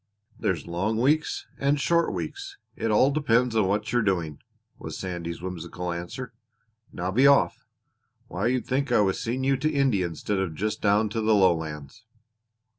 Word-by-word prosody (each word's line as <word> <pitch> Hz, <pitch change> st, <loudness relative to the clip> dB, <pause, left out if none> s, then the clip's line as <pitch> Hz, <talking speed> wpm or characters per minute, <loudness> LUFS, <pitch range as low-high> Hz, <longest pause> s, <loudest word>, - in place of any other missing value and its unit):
"There's 85 Hz, -6 st, -1 dB
long 95 Hz, +6 st, -1 dB
weeks 150 Hz, +5 st, +1 dB
and 140 Hz, +1 st, +2 dB
short 170 Hz, +6 st, +2 dB
weeks; 400 Hz, 0 st, -6 dB, 0.2 s
it 115 Hz, -, -2 dB
all 130 Hz, +6 st, +4 dB
depends 125 Hz, -5 st, +2 dB
on 105 Hz, -4 st, +3 dB
what 105 Hz, +4 st, -1 dB
you're 120 Hz, -, +3 dB
doing," 85 Hz, -8 st, -1 dB, 0.4 s
was -, -, -7 dB
Sandy's 85 Hz, -2 st, -5 dB
whimsical 90 Hz, 0 st, -5 dB
answer. 85 Hz, +9 st, -6 dB, 0.6 s
"Now 90 Hz, +2 st, -3 dB
be 130 Hz, +7 st, +5 dB
off. 140 Hz, -1 st, +3 dB, 0.6 s
Why, 95 Hz, +5 st, -2 dB
you'd 125 Hz, 0 st, 0 dB
think 135 Hz, +2 st, -1 dB
I -, -, +5 dB
was 95 Hz, -2 st, +1 dB
seeing 125 Hz, +3 st, -2 dB
you 135 Hz, 0 st, +2 dB
to 150 Hz, +4 st, 0 dB
India 130 Hz, -, +2 dB
instead 95 Hz, +4 st, -3 dB
of 90 Hz, -5 st, -2 dB
just 105 Hz, +5 st, -2 dB
down 105 Hz, +1 st, +3 dB
to 110 Hz, +2 st, -2 dB
the 110 Hz, 0 st, +3 dB
lowlands!" 80 Hz, -2 st, 0 dB
105 Hz, 170 wpm, -26 LUFS, 90-130 Hz, 0.6 s, be